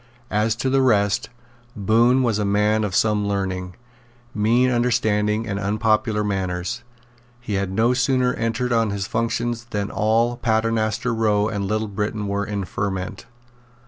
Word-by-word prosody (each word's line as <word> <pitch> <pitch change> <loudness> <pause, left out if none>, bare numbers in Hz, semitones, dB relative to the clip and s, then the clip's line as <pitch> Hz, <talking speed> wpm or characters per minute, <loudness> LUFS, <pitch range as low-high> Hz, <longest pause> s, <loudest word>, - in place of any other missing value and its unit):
As 110 +1 +1
to 125 - -2
the 135 0 +3
rest, 100 -5 +2 0.5
Bohun 115 +5 +3
was 115 -4 +1
a - - 0
man 105 +2 +2
of 100 -3 -2
some 105 -1 +2
learning, 95 -2 -3 0.6
mean 120 +4 +2
understanding 110 -3 +1
and 100 -2 -3
unpopular 105 +1 +1
manners. 95 +2 -2 0.6
He 120 -3 -5
had 100 -1 -1
no 115 +5 +2
sooner 125 0 +2
entered 115 +2 -1
on 115 -2 +2
his 100 -1 -3
functions 115 +2 -2
than 105 -3 -3
all 115 +4 +1
Paternoster 115 +1 0
Row 105 -2 +1
and 100 -3 -3
Little 110 +2 -1
Britain 105 +1 -3
were 100 0 -2
in 100 -2 -3
a - - -5
ferment. 95 +1 -4
110 Hz, 150 wpm, -22 LUFS, 100-115 Hz, 0.6 s, the